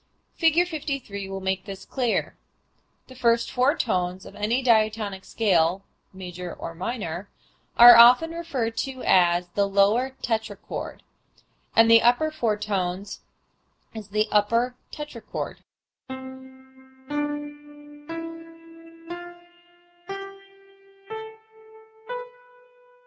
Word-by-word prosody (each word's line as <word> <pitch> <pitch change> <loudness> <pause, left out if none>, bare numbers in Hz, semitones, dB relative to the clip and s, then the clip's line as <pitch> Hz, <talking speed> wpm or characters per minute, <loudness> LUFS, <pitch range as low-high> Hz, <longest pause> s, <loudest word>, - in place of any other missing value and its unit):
Fig. 330 +1 +3
53 275 - -5
will 195 0 -5
make 190 0 -2
this 195 -2 -8
clear. 245 -4 -1 0.7
The 260 - -12
first 235 -2 +1
four 260 +5 +2
tones 185 -4 -1
of - - -12
any 225 +5 0
diatonic 215 -4 +1
scale 185 -3 +1 0.3
(major 180 -2 -7
or 165 - -7
minor) 185 0 -5 0.5
are 240 0 +11
often 245 +8 +7
referred 270 -9 -3
to 265 -1 -4
as 175 -1 +3
the 200 +3 0
lower 210 +7 +2
tetrachord 220 -3 -4 0.7
and 225 0 +7
the 230 0 +8
upper 245 +7 +3
four 230 -8 0
tones 195 -2 -3 0.7
as 220 -3 -8
the 215 +2 +1
upper 230 +4 +2 0.2
tetrachord. 295 -6 -6
215 Hz, 90 wpm, -25 LUFS, 195-250 Hz, 0.7 s, are